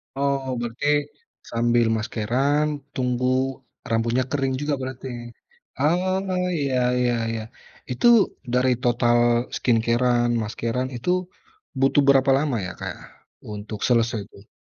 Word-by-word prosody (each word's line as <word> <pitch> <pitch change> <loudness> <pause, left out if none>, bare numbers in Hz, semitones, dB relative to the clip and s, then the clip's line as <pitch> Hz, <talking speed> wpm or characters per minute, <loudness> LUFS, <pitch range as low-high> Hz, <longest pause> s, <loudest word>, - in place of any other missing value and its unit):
Oh, 135 -1 -1
berarti 120 +4 -3 0.6
sambil 120 0 +2
maskeran, 120 +7 0 0.3
tunggu 125 -1 0 0.6
rambutnya 115 +3 +1
kering 135 -2 0
juga, 145 0 0
berarti? 130 0 -6 0.7
Oh, 185 +4 +1
iya 140 -3 0 0.2
iya 125 -1 +2 0.2
iya. 115 -1 -3 0.5
Itu, 125 - +2 0.5
dari 125 +1 +3
total 120 0 +3 0.4
skincare-an, 120 +1 +2
maskeran 115 +4 -2
itu 120 +8 -4 0.7
butuh 135 +2 +4
berapa 135 0 +5
lama 140 -2 0
ya 90 - -5
Kak, - - -5 0.6
untuk 105 +1 -7
selesai 115 -2 +2
tuh? 100 +1 -17
125 Hz, 110 wpm, -23 LUFS, 115-140 Hz, 0.7 s, berapa